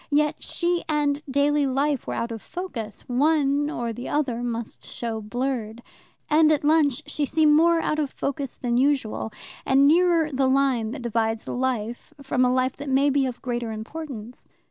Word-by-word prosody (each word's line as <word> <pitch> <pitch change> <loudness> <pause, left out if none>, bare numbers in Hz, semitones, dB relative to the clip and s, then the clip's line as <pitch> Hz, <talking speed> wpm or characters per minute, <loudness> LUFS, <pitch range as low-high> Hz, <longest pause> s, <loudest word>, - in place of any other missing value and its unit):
Yet 300 0 +1
she 345 0 -1
and 295 -1 +1
daily 285 +1 +2
life 275 +1 0
were - - -2
out 235 0 -2
of 225 -2 -6
focus: 235 - -6
one 290 +2 +2
or 235 -6 -3
the 245 +3 -6
other 260 -6 0
must 235 -2 -5
show 225 -2 -4
blurred. 240 0 -3 0.4
And 310 +1 +5
at 300 -1 +1
lunch 300 -2 +3
she 300 - -2
seemed 300 +1 +3
more 335 +2 +5
out 310 -1 -1
of 295 -3 0
focus 275 -1 -4
than 240 -1 -1
usual, 260 -5 0 0.3
and 275 +1 +4
nearer 335 -1 +4
the 265 -1 +1
line 260 -4 +2
that 255 +2 -6
divides 225 -1 -1
life 245 +2 -3
from 270 -2 0
a 250 - +3
life 255 0 0
that 285 - -6
may 275 +2 +3
be 275 -1 +2
of 250 -1 -7
greater 240 -2 -2
importance. 240 0 -7
270 Hz, 175 wpm, -24 LUFS, 240-295 Hz, 0.4 s, And